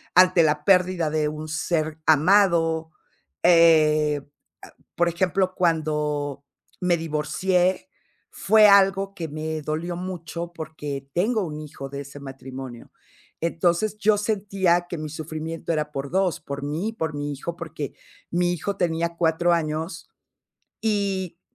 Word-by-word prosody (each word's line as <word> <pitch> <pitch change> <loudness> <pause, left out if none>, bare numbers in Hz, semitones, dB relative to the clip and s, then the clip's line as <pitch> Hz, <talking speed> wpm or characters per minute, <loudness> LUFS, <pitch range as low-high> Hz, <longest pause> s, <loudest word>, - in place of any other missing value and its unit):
ante 185 -2 +6
la 150 -1 +1
pérdida 180 -3 +3
de 155 -1 0
un 155 +1 -5
ser 155 -1 -1
amado, 165 -1 +3 0.5
eh, 155 -3 +5 0.4
ah, - - -12 0.2
por 175 0 +2
ejemplo, 185 +1 0
cuando 150 -4 -1 0.3
me 180 -2 +2
divorcié, 170 +4 0 0.4
fue 215 +1 +5
algo 195 0 +4
que 170 -5 -5
me 155 +1 -4
dolió 160 +4 -3
mucho 175 -1 -6
porque 150 -4 -6
tengo 210 +4 +1
un 155 -3 -5
hijo 140 -2 -8
de 140 +1 -6
ese 140 0 -9
matrimonio. 130 -2 -9 0.5
Entonces, 175 +5 0
yo 210 0 +3
sentía 195 -4 +1
que 175 - -5
mi 155 -1 -5
sufrimiento 160 +2 -4
era 150 -1 -2
por 140 -1 -4
dos, 185 -3 +1
por 140 0 -6
mí 155 +8 -2
y 225 - -7
por 160 -7 -3
mi 145 0 -3
hijo, 170 +5 -6
porque 155 -4 -6 0.4
mi 175 +1 +1
hijo 195 +3 -3
tenía 170 -1 -1
cuatro 170 +1 +2
años 160 +1 -2 0.7
y 195 -5 -1
165 Hz, 135 wpm, -24 LUFS, 150-180 Hz, 0.7 s, ante